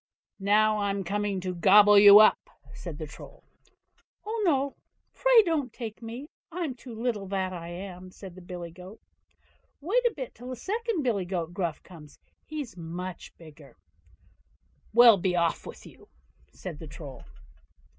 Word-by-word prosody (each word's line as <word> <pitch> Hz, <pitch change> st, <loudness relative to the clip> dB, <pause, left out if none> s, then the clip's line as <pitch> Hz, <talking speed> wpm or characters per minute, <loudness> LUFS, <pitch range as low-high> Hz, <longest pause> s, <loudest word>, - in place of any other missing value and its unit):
"Now, 210 Hz, +2 st, +3 dB
I'm 200 Hz, -1 st, -1 dB
coming 205 Hz, 0 st, -2 dB
to 185 Hz, 0 st, -3 dB
gobble 205 Hz, +3 st, +6 dB
you 205 Hz, 0 st, +10 dB
up", 215 Hz, -, +5 dB, 0.2 s
said -, -, -8 dB
the -, -, -5 dB
Troll. -, -, -13 dB, 0.8 s
"Oh, 440 Hz, +1 st, -3 dB
no! 280 Hz, -6 st, +1 dB, 0.4 s
pray -, -, +5 dB
don't 310 Hz, -, -1 dB
take 225 Hz, -2 st, -8 dB
me. 235 Hz, +5 st, -7 dB, 0.2 s
I'm 330 Hz, -5 st, -3 dB
too 245 Hz, -1 st, -11 dB
little, 225 Hz, -5 st, -2 dB
that 190 Hz, -1 st, -2 dB
I 170 Hz, -2 st, -7 dB
am", 180 Hz, +1 st, -8 dB
said 185 Hz, 0 st, -11 dB
the 185 Hz, -, -13 dB
billy 175 Hz, -1 st, -8 dB
goat; 185 Hz, +5 st, -12 dB, 0.8 s
"wait 415 Hz, -, +1 dB
a 465 Hz, -, -2 dB
bit 260 Hz, -4 st, -6 dB
till 245 Hz, +2 st, -11 dB
the 255 Hz, -, -4 dB
second 435 Hz, -, -2 dB
billy 210 Hz, -7 st, 0 dB
goat 175 Hz, -2 st, -4 dB
Gruff 170 Hz, -4 st, -3 dB
comes, 155 Hz, -5 st, -14 dB, 0.3 s
he's 300 Hz, -6 st, -6 dB
much 175 Hz, +2 st, -7 dB
bigger." 155 Hz, -3 st, -15 dB, 1.1 s
"Well! 235 Hz, -2 st, +8 dB
be 180 Hz, 0 st, 0 dB
off 170 Hz, -1 st, 0 dB
with -, -, -11 dB
you", -, -, -16 dB, 0.4 s
said 170 Hz, -5 st, -8 dB
the 160 Hz, -, -9 dB
Troll. 145 Hz, -2 st, -10 dB
200 Hz, 155 wpm, -27 LUFS, 180-250 Hz, 1.1 s, you